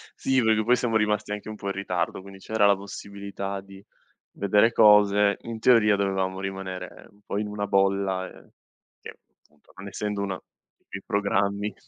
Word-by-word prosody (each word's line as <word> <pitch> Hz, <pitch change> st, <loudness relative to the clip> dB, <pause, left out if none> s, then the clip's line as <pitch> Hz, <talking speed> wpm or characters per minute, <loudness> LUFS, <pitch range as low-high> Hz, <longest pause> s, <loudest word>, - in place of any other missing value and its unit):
Sì, 130 Hz, -1 st, +1 dB
perché 110 Hz, -1 st, +3 dB
poi 120 Hz, +3 st, +4 dB
siamo 120 Hz, -2 st, -1 dB
rimasti 105 Hz, -1 st, 0 dB
anche 105 Hz, +1 st, -5 dB
un 110 Hz, -, -6 dB
po' 100 Hz, -, -7 dB
in 100 Hz, -, -1 dB
ritardo, 95 Hz, -2 st, -3 dB
quindi 100 Hz, 0 st, -12 dB
c'era 110 Hz, +1 st, +1 dB
la 100 Hz, -, +5 dB
possibilità 100 Hz, 0 st, -7 dB
di 95 Hz, 0 st, -14 dB, 0.5 s
vedere 105 Hz, +3 st, +3 dB
cose. 105 Hz, -2 st, +5 dB
In 115 Hz, -1 st, -7 dB
teoria 110 Hz, -3 st, +5 dB
dovevamo 95 Hz, -1 st, -1 dB
rimanere 95 Hz, -1 st, -6 dB
un 100 Hz, -, -26 dB
po' -, -, -3 dB
in 105 Hz, -, -3 dB
una 105 Hz, 0 st, -3 dB
bolla, 95 Hz, -1 st, +1 dB
ehm, -, -, -17 dB, 0.5 s
che -, -, -9 dB, 0.3 s
appunto, 75 Hz, -1 st, -27 dB
non 95 Hz, +1 st, -9 dB
essendo 105 Hz, +1 st, -3 dB
una 95 Hz, -2 st, -3 dB, 0.5 s
che 95 Hz, -, -7 dB
programmi 100 Hz, -1 st, 0 dB
100 Hz, 170 wpm, -25 LUFS, 95-105 Hz, 0.5 s, la